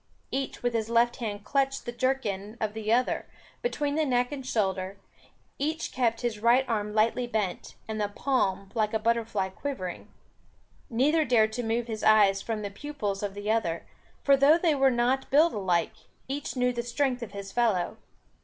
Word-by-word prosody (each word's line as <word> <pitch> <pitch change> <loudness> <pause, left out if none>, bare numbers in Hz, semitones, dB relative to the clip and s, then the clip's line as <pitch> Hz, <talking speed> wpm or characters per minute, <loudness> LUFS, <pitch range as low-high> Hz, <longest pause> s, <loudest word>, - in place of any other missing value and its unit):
Each 270 -2 -3
with 245 -1 +1
his 225 -1 -1
left 235 +1 +3
hand 205 -3 -4
clutched 275 0 0
the 240 - -3
jerkin 235 -5 -2
of 215 -1 -1
the 220 0 -2
other, 250 +2 +1 0.3
between 295 -12 -1
the 315 +1 +2
neck 245 -2 +1
and 280 -2 -5
shoulder, 195 -5 -1 0.6
each 315 +3 -2
kept 235 -3 0
his 235 -4 -2
right 240 +4 +4
arm 210 -3 -1
lightly 230 +3 +2
bent, 210 -6 -3
and 220 -1 -3
the 205 - +1
palm 200 -5 -1
like 220 -2 0
a - - +2
butterfly 225 -3 0
quivering. 190 -4 -5 0.8
Neither 290 +7 +3
dared 220 -5 +3
to 245 - -2
move 230 +1 -1
his 220 -2 -5
eyes 205 -3 +5
from 220 -1 -3
the 200 - -4
pupils 210 -5 -4
of 200 -1 -3
the 205 +1 -2
other; 170 -7 0 0.4
for 280 - +6
though 280 +4 +6
they 335 -2 +2
were 270 -1 +4
not 250 +2 +1
built 310 +5 +5
alike, 180 -5 0 0.3
each 280 +2 -4
knew 250 -1 +1
the 240 - -2
strength 250 +1 -1
of 220 -4 -7
his 200 -1 -7
fellow. 210 -6 +1
235 Hz, 180 wpm, -28 LUFS, 210-265 Hz, 0.8 s, for